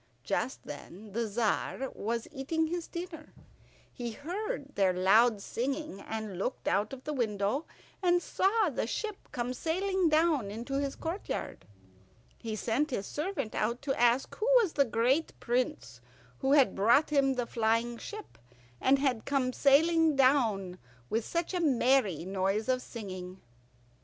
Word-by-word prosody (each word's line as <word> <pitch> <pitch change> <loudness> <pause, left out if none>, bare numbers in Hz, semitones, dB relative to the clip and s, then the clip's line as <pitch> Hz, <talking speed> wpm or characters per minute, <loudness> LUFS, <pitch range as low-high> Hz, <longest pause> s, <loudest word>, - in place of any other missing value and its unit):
Just - - -2
then 205 +4 -9
the 230 +2 -1
Tzar 230 +4 -1
was 230 +2 -3
eating 310 +4 -1
his 340 +1 -3
dinner. 340 -3 -8 0.6
He 240 -2 -5
heard 310 - -5
their 190 -2 +3
loud 200 +4 +4
singing, 275 -2 -3
and 215 -4 -5
looked 250 +6 -3
out 205 +5 +1
of 265 -1 -8
the 300 - -3
window 220 +2 -1 0.3
and 355 -1 +4
saw 390 +1 +1
the 235 - -2
ship 425 - -5
come 245 +1 -2
sailing 370 +5 0
down 310 -8 +2
into 235 +6 -3
his 280 -1 -2
courtyard. 340 +5 -5 0.7
He 220 -2 -4
sent 245 +8 0
his 205 -7 -3
servant 300 - -3
out 235 +5 -1
to 275 -1 0
ask 240 +2 +2
who 435 - -1
was 405 -8 0
the 280 - +3
great 250 +7 +1
prince 125 - -2 0.4
who 270 +1 +2
had 275 -8 +5
brought 235 +10 +4
him 275 -2 +3
the 245 -1 -1
flying 230 +1 0
ship, 425 - -9 0.4
and 270 +1 +5
had 265 -5 0
come 260 -3 0
sailing 320 +3 +4
down 225 -9 +2 0.3
with 225 +1 +1
such 340 +2 -2
a 360 - 0
merry 255 - +2
noise 195 +3 -1
of 255 -1 +1
singing. 185 -6 -7
255 Hz, 150 wpm, -30 LUFS, 220-310 Hz, 0.7 s, had